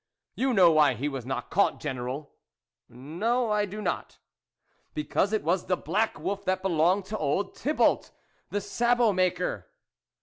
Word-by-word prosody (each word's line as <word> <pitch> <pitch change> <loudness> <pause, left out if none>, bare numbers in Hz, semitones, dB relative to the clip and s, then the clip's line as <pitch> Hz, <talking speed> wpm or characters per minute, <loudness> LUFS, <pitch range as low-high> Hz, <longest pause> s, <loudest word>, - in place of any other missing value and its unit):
" - - -62
You 265 +1 +1
know 180 -4 +7
why 150 -4 +4
he 135 +6 -2
was 135 -4 -5
not 135 - -4
caught, 200 +4 +2
General." 135 0 -5 0.4
" - - -62
No, 210 - -1
I 210 -1 +1
do 210 +2 -7
not." - - -3 0.4
" - - -44
Because 300 -9 0
it 215 - 0
was 175 +3 0
the 180 -1 +1
black 205 +4 -1
wolf 195 +5 -3
that 185 0 0
belonged 180 +2 +2
to 215 +3 -4
old 160 +7 -1
Thibault, 300 +4 +1 0.4
the 205 - -2
sabot 235 +2 +2
maker." 180 -1 -1
185 Hz, 170 wpm, -27 LUFS, 155-210 Hz, 0.4 s, know